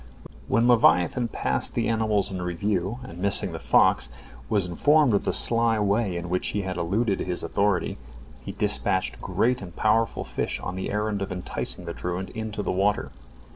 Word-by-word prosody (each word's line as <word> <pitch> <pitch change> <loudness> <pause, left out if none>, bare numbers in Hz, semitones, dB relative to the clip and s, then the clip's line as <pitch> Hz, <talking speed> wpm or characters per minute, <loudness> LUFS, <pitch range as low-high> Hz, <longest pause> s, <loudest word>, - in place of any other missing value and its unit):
When 115 +1 +2
leviathan 120 -1 +4
passed 65 - -2
the - - 0
animals 110 -3 0
in 95 -1 -4
review, 95 +4 -2
and 85 -9 -10
missing 100 +1 +2
the - - -6
fox 60 0 +3 0.4
was 100 -4 +2
informed 145 - +3
of 100 - +1
the - - +1
sly 115 -1 +3
way 100 -2 0
in 85 0 -5
which 90 +1 -1
he 105 - -2
had 95 -1 -4
eluded 100 +5 0
his 90 -1 -3
authority, 100 -8 0 0.4
he - - -5
dispatched - - 0
great 125 +2 0
and 85 -3 -9
powerful 110 +1 +1
fish - - -3
on 90 - -5
the 95 - -4
errand 105 -1 -1
of 100 - -3
enticing 90 0 -3
the 85 - -5
truant 90 +2 -4
into 110 -2 -4
the - - -1
water. 95 -6 0
100 Hz, 175 wpm, -25 LUFS, 90-110 Hz, 0.4 s, leviathan